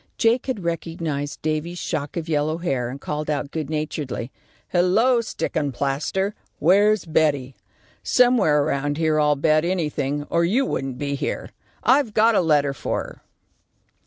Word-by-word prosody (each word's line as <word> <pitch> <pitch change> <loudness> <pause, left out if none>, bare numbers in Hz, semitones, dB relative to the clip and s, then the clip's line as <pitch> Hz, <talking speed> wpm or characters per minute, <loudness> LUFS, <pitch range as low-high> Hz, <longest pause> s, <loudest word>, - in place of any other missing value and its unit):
Jake 235 +3 +2
had 235 -8 -3
recognised 165 -4 -3
Davy's 155 +3 -2
shock 145 -3 -3
of 165 -1 -3
yellow 155 0 0
hair, 135 -8 -1
and 135 +3 -7
called 150 +1 -4
out, 145 -1 -2
good 155 -3 -4
naturedly, 150 -5 -3 0.4
"Hello, 215 +8 +3
stickin' 150 -9 -2
plaster, 145 - -1 0.2
where's 205 +6 +4
Betty? 145 -5 +1 0.5
Somewhere 225 - +4
around 145 +1 -1
here, 155 -1 +2
I'll 150 -1 +3
bet 155 +2 +2
anything, 150 -5 -1
or 170 0 +3
you 230 +11 +2
wouldn't 135 - -3
be 140 +1 -2
here. 140 +1 -3 0.3
I've 260 -5 +3
got 225 +2 +5
a 205 - +4
letter 145 -4 +2
for - - -2
her." - - -12
155 Hz, 150 wpm, -23 LUFS, 145-180 Hz, 0.5 s, got